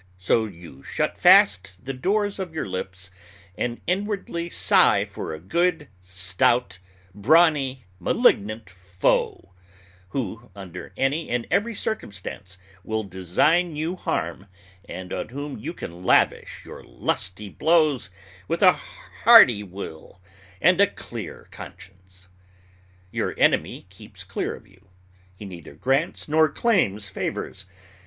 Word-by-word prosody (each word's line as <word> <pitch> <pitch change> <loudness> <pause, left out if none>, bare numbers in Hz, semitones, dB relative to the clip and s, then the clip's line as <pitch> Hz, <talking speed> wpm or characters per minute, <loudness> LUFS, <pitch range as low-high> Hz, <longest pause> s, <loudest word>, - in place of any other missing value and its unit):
So 95 +5 +1
you 85 -9 -12
shut - - -2
fast 95 +1 +5
the 130 +6 -6
doors 200 +9 -1
of 180 -4 -5
your 155 - -3
lips, 95 0 -6 0.4
and 120 -1 -3
inwardly 185 -2 -2
sigh - - +4
for - - -7
a 80 - -6
good, 165 - 0
stout, 95 +3 0 0.3
brawny, 135 - +3
malignant 105 +4 +2
foe, 90 0 -1 0.6
who, 115 0 -5
under 90 -3 -9
any 145 +5 0
and 120 -1 -1
every 215 +4 +1
circumstance, 100 - -5 0.3
will 110 +2 -2
design 100 - +1
you 160 +4 -2
harm, 100 - -3 0.4
and 90 0 -7
on - - -4
whom 140 0 -6
you 110 - -5
can 90 - -9
lavish - - +2
your - - -10
lusty 100 +3 -3
blows 155 - +2 0.4
with 165 +4 -1
a 185 -1 +8 0.5
hearty 215 - +8
will 95 -3 -9 0.4
and 180 +2 +5
a 200 - +6
clear 115 - -9
conscience. 95 -1 -13 0.8
Your - - -2
enemy - - +1
keeps - - -12
clear - - -3
of - - -16
you. 95 +1 -24 0.5
He 105 - -10
neither 85 -6 -10
grants 135 - -1
nor 155 +1 +4
claims 140 - +1
favors. 95 -1 -5
110 Hz, 125 wpm, -24 LUFS, -, 0.8 s, a